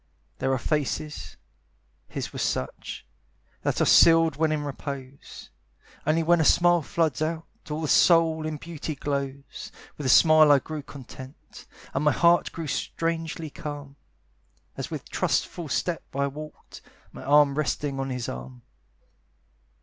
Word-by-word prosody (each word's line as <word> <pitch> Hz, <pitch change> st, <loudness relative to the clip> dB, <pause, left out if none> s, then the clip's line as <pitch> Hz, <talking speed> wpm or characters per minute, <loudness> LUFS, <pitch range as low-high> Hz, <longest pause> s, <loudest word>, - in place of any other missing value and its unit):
There 135 Hz, 0 st, 0 dB
are 130 Hz, -, +2 dB
faces 150 Hz, +2 st, -3 dB, 0.7 s
his -, -, -5 dB
was -, -, -4 dB
such 65 Hz, -, -3 dB, 0.6 s
That -, -, -1 dB
are -, -, +4 dB
sealed 165 Hz, -2 st, +6 dB
when 155 Hz, +1 st, +1 dB
in 150 Hz, -1 st, -1 dB
repose; 140 Hz, -1 st, -8 dB, 0.6 s
Only 160 Hz, +2 st, +2 dB
when 170 Hz, 0 st, +4 dB
a -, -, +3 dB
smile 175 Hz, +2 st, +4 dB
floods 160 Hz, -1 st, -1 dB
out, 160 Hz, +1 st, -2 dB, 0.2 s
All 150 Hz, +1 st, -3 dB
the -, -, -1 dB
soul 165 Hz, 0 st, +4 dB
in 155 Hz, -1 st, -4 dB
beauty 155 Hz, 0 st, -6 dB
glows. 140 Hz, -1 st, -5 dB, 0.3 s
With 145 Hz, -, -4 dB
that -, -, +1 dB
smile 155 Hz, +2 st, +7 dB
I 145 Hz, -, +7 dB
grew 155 Hz, +2 st, -5 dB
content, 135 Hz, -1 st, -12 dB, 0.3 s
And -, -, -1 dB
my 150 Hz, -, +4 dB
heart 170 Hz, +3 st, +3 dB
grew 165 Hz, -, -6 dB
strangely 165 Hz, +1 st, -3 dB
calm, 145 Hz, -2 st, -7 dB, 0.8 s
As -, -, -5 dB
with -, -, -6 dB
trustful 170 Hz, -4 st, -1 dB
step 175 Hz, +3 st, -1 dB
I 140 Hz, 0 st, +1 dB
walked, 150 Hz, +2 st, -9 dB, 0.3 s
My -, -, -10 dB
arm 145 Hz, +1 st, +5 dB
resting 140 Hz, -1 st, -2 dB
on 135 Hz, 0 st, -2 dB
his 125 Hz, -3 st, -3 dB
arm. 65 Hz, 0 st, -8 dB
150 Hz, 145 wpm, -26 LUFS, 140-160 Hz, 0.8 s, smile